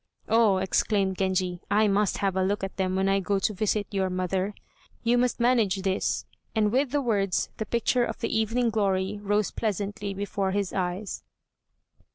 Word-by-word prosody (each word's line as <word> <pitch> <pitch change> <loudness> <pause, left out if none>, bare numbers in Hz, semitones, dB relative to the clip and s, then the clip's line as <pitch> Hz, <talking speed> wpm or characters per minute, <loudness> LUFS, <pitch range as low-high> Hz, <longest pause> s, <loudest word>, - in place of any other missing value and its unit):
"Oh," 220 -3 +4
exclaimed 190 0 +1
Genji, 185 -2 0
"I 210 +1 +4
must 205 0 +1
have 195 -2 0
a 190 - +2
look 200 +2 0
at 195 - -5
them 185 -1 0
when 190 0 +1
I 195 0 +3
go 200 +1 0
to 205 +2 0
visit 210 +1 0
your 190 -2 0
mother; 185 +2 -1 0.5
you 235 +1 +3
must 245 0 +1
manage 225 -6 +2
this," 190 -1 0 0.3
and 210 -1 +2
with 265 +3 +2
the 290 +2 0
words 200 -6 0
the 220 - -4
picture 240 +2 +1
of - - -3
the 230 - -2
"Evening 230 +2 +1
Glory" 200 -1 0
rose 205 0 +1
pleasantly 205 -1 -3
before 195 -1 -2
his 200 -2 -1
eyes. 185 +2 -3
200 Hz, 180 wpm, -27 LUFS, 190-220 Hz, 0.5 s, Oh